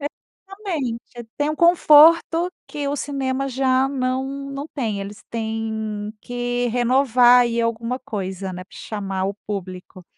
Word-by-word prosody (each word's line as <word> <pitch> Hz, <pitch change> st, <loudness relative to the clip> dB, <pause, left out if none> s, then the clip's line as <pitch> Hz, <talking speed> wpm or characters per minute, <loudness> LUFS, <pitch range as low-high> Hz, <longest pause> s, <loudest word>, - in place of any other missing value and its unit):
Exatamente, 290 Hz, -, -6 dB
tem 295 Hz, +1 st, 0 dB
um 305 Hz, -, -2 dB
conforto, 335 Hz, 0 st, +6 dB, 0.2 s
que 290 Hz, -1 st, -5 dB
o 285 Hz, -, -1 dB
cinema 275 Hz, -1 st, -2 dB
já 265 Hz, 0 st, +2 dB
não 260 Hz, -1 st, -1 dB, 0.3 s
não 275 Hz, +1 st, -5 dB
tem, 220 Hz, -8 st, -2 dB
eles 200 Hz, +1 st, -8 dB
têm 220 Hz, -2 st, -3 dB
que 245 Hz, 0 st, -2 dB
renovar 245 Hz, 0 st, +4 dB
aí 235 Hz, -1 st, +1 dB
alguma 230 Hz, +2 st, -2 dB
coisa, 190 Hz, -5 st, -5 dB
né, 180 Hz, 0 st, -7 dB
pra -, -, -17 dB
chamar 195 Hz, -3 st, -4 dB
o 195 Hz, +1 st, -2 dB
público. 185 Hz, -2 st, -7 dB
245 Hz, 135 wpm, -22 LUFS, 215-275 Hz, 0.3 s, conforto